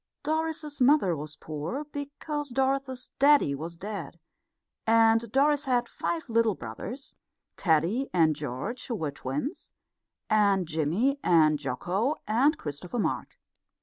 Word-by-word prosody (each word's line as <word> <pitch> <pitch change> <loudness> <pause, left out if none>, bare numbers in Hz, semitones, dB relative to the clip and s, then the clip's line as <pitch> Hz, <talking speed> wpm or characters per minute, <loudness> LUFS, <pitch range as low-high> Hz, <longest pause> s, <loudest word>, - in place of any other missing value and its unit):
Doris's 315 -1 -2
mother 250 - +4
was 155 +1 -7
poor, 160 - -5
because 290 0 -5
Doris's 265 0 -1
daddy 285 - +5
was 165 +4 -6
dead, 185 -4 -6 0.7
and 225 0 +4
Doris 290 +3 +3
had 245 -2 +1
five 330 +4 -3
little 230 -3 +2
brothers 205 - -7 0.4
Teddy 180 - +1
and 160 -4 +3
George, 145 - -5
who 240 - -2
were 155 -8 -2
the 140 - -18
twins, 145 - -4 0.6
and 200 -4 +3
Jimmy 170 - +1
and 155 -3 +4
Jocko 180 - -1
and 260 +9 +3
Christopher 155 - -6
Mark. 225 - -2
225 Hz, 125 wpm, -28 LUFS, -, 0.7 s, daddy